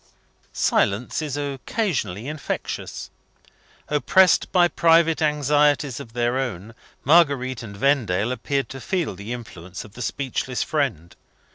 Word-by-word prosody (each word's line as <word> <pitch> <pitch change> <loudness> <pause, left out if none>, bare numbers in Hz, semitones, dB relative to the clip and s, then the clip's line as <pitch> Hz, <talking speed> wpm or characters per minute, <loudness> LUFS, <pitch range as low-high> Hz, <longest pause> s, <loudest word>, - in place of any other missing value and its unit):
Silence 105 +9 +1
is 145 -2 -3
occasionally 140 - -2
infectious. 150 -2 -5 0.8
Oppressed 165 +6 +3
by 175 -2 +5
private 165 -1 +3
anxieties 150 -2 +2
of 115 - -10
their 120 +2 0
own, 115 -4 -4 0.3
Marguerite 140 -6 +3
and 100 -4 -9
Vendale 120 -5 +1
appeared 135 +2 -2
to 135 - -8
feel 180 - -1
the 100 +5 -8
influence 95 -7 -8
of 105 - -15
the 125 - -9
speechless 130 -1 -2
friend. 130 - -2
135 Hz, 120 wpm, -23 LUFS, 115-150 Hz, 0.8 s, by